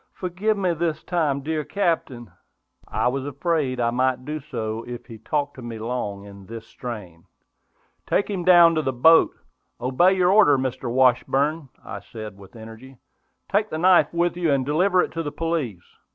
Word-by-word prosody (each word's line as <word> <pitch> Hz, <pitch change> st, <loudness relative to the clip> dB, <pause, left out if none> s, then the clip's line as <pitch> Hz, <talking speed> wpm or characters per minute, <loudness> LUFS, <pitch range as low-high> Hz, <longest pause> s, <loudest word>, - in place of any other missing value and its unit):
Forgive 190 Hz, +4 st, -2 dB
me 185 Hz, -3 st, 0 dB
this 160 Hz, -1 st, -2 dB
time, 155 Hz, -6 st, 0 dB
dear 155 Hz, +1 st, -2 dB
Captain!" 145 Hz, -, -2 dB, 0.6 s
I -, -, 0 dB
was 130 Hz, +2 st, -1 dB
afraid 145 Hz, -2 st, -1 dB
I 115 Hz, -1 st, +1 dB
might 130 Hz, +1 st, 0 dB
do 155 Hz, +2 st, -4 dB
so 115 Hz, -6 st, -5 dB
if 120 Hz, 0 st, -7 dB
he 115 Hz, -3 st, -11 dB
talked 145 Hz, +2 st, -2 dB
to -, -, -8 dB
me 120 Hz, -2 st, -7 dB
long 110 Hz, -3 st, -4 dB
in 100 Hz, -1 st, -13 dB
this 115 Hz, 0 st, -8 dB
strain. 100 Hz, -10 st, -9 dB, 0.8 s
"Take 200 Hz, -, +1 dB
him 195 Hz, -4 st, -3 dB
down 175 Hz, -2 st, +7 dB
to 160 Hz, -, +1 dB
the 135 Hz, -3 st, -2 dB
boat! 160 Hz, +7 st, +5 dB, 0.4 s
Obey 130 Hz, +10 st, +3 dB
your 185 Hz, -1 st, +3 dB
order, 190 Hz, -9 st, +5 dB
Mr. 130 Hz, -2 st, -3 dB
Washburn!" 135 Hz, +4 st, +2 dB, 0.2 s
I 100 Hz, -, -6 dB
said, 110 Hz, 0 st, -9 dB
with 100 Hz, +3 st, -15 dB
energy. 115 Hz, +4 st, -12 dB, 0.5 s
"Take 210 Hz, +2 st, 0 dB
the 155 Hz, -, -4 dB
knife 180 Hz, +2 st, +4 dB
with 170 Hz, 0 st, 0 dB
you, 170 Hz, -3 st, 0 dB
and 135 Hz, -2 st, +1 dB
deliver 180 Hz, +6 st, +2 dB
it -, -, -5 dB
to 165 Hz, -, -3 dB
the 145 Hz, -2 st, -4 dB
police." 150 Hz, -, -3 dB
140 Hz, 180 wpm, -23 LUFS, 120-170 Hz, 0.8 s, down